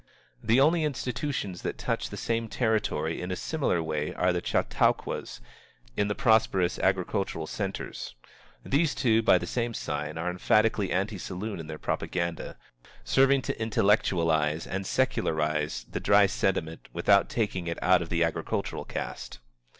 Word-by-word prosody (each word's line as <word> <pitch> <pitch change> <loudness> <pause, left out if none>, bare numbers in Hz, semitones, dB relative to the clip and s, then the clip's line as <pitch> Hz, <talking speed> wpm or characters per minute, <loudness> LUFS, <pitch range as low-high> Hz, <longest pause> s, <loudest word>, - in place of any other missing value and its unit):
The 115 +4 +3
only 160 +4 +4
institutions 125 - -3
that - - -3
touch - - -2
the - - -7
same 115 0 -1
territory 110 -9 0
in 90 - -4
a 90 - -1
similar 135 - -1
way 75 -1 -3
are 90 0 +2
the 90 - -1
Chautauquas - - 0 0.5
in 105 - +1
the 105 - -1
prosperous 110 -8 +2
agricultural - - 0
centres. - - -5 0.5
These, 150 +2 +1
too, 115 -4 +3
by 115 - +5
the - - -4
same 120 -2 -2
sign 75 +1 -3
are 85 +2 -1
emphatically 105 +2 +2
anti 95 +2 -1
saloon 95 +2 -5
in 80 - -7
their 75 -1 -6
propaganda, 85 +1 -3 0.5
serving 135 0 +3
to - - -4
intellectualize 85 -8 +2
and 95 0 -4
secularize 75 - 0
the - - -2
dry - - +5
sentiment 80 +1 -1
without 100 -1 +3
taking 95 -6 -2
it 85 - -2
out 90 -1 +5
of 85 - -5
the 85 0 +2
agricultural 85 -1 -2
caste. - - -6
95 Hz, 150 wpm, -28 LUFS, 85-115 Hz, 0.5 s, by